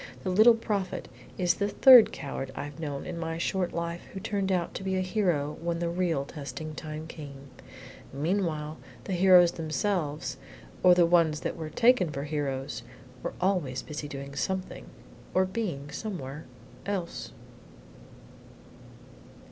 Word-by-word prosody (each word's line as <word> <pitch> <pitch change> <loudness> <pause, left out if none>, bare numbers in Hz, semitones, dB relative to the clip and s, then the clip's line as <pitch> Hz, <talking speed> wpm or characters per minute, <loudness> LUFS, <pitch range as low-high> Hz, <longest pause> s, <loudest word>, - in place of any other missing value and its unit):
"The 185 - -1
Little 220 +5 +7
Prophet 205 -4 -3 0.3
is 175 -2 +3
the 200 - -1
third 255 0 +8
coward 135 -1 -5
I - - -4
have 145 +2 -9
known 145 -3 -4
in 175 -2 -5
my 165 0 -3
short 180 +1 -1
life 170 0 -3
who 195 - -5
turned 195 0 -1
out 180 -2 0
to - - -5
be 190 0 -1
a 185 - +1
hero 175 -7 0
when 170 0 -1
the 170 0 -1
real 170 -6 0
testing 155 +1 -7
time 155 0 -6
came. 140 -4 -10 0.6
Meanwhile 155 0 -1 0.2
the 195 - -4
heroes 180 -1 +7
themselves 160 -2 -2 0.4
or 180 -1 +7
the 175 -1 +5
ones 165 -3 +3
that - - -3
were 160 -2 -5
taken 230 -2 +4
for 140 -2 -4
heroes 140 -2 -3 0.4
were - - -4
always 175 -9 0
busy 150 -1 -6
doing 140 -1 -7
something, 185 +5 -3 0.5
or 185 0 +4
being 185 -9 -4
somewhere, 150 -6 -6 0.4
else." 190 -4 -3
170 Hz, 150 wpm, -28 LUFS, 150-185 Hz, 0.6 s, third